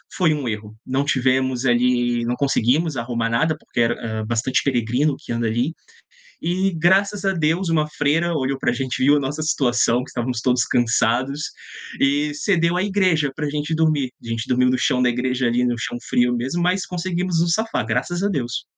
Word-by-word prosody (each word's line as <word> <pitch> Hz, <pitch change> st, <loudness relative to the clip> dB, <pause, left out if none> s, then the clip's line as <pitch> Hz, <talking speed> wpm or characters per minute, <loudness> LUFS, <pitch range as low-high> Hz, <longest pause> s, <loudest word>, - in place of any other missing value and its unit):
foi 170 Hz, -5 st, +3 dB
um 145 Hz, -4 st, -3 dB
erro. 105 Hz, -1 st, -5 dB
Não 130 Hz, +2 st, 0 dB
tivemos 130 Hz, -2 st, +1 dB
ali, 120 Hz, -1 st, +2 dB
não 120 Hz, +1 st, -1 dB
conseguimos 140 Hz, +4 st, +1 dB
arrumar 115 Hz, -1 st, -2 dB
nada, 155 Hz, +7 st, +1 dB
porque 125 Hz, -, -6 dB
era 115 Hz, -1 st, -1 dB
bastante 115 Hz, +3 st, 0 dB
peregrino 130 Hz, +3 st, +1 dB
que -, -, -9 dB
anda 115 Hz, 0 st, -1 dB
ali 120 Hz, +8 st, -1 dB, 0.7 s
e, 185 Hz, +3 st, 0 dB
graças 195 Hz, +4 st, +2 dB
a 195 Hz, -, +2 dB
Deus, 165 Hz, +2 st, 0 dB
uma 155 Hz, -2 st, +1 dB
freira 155 Hz, +3 st, 0 dB
olhou 135 Hz, -3 st, -1 dB
para 120 Hz, -, 0 dB
gente, 130 Hz, +1 st, -2 dB
viu 145 Hz, +2 st, +5 dB
a -, -, +2 dB
nossa 145 Hz, +3 st, -3 dB
situação, 125 Hz, -5 st, +1 dB
que -, -, -11 dB
estávamos 120 Hz, -1 st, -3 dB
todos 125 Hz, -1 st, +2 dB
cansados 120 Hz, +4 st, +1 dB, 0.6 s
e 145 Hz, +2 st, +1 dB
cedeu 170 Hz, +1 st, +1 dB
a 185 Hz, -, +1 dB
igreja 185 Hz, -8 st, +1 dB
para 150 Hz, 0 st, -2 dB
gente 150 Hz, +2 st, -2 dB
dormir. 155 Hz, -5 st, +1 dB
A -, -, -10 dB
gente 115 Hz, +1 st, -3 dB
dormiu 125 Hz, 0 st, +3 dB
no 130 Hz, -, +1 dB
chão 125 Hz, -, +1 dB
da 125 Hz, -, +4 dB
igreja, 125 Hz, +1 st, 0 dB
ali 120 Hz, +1 st, +1 dB
no 120 Hz, -1 st, 0 dB
chão 120 Hz, +2 st, -4 dB
frio 120 Hz, 0 st, +2 dB
mesmo, 130 Hz, +8 st, -2 dB
mas 180 Hz, +1 st, +1 dB
conseguimos 180 Hz, -1 st, -1 dB
nos 170 Hz, 0 st, +2 dB
safar, 220 Hz, -, -1 dB
graças 175 Hz, -, -1 dB
a -, -, +3 dB
Deus. 125 Hz, -10 st, -2 dB
135 Hz, 190 wpm, -21 LUFS, 120-165 Hz, 0.7 s, viu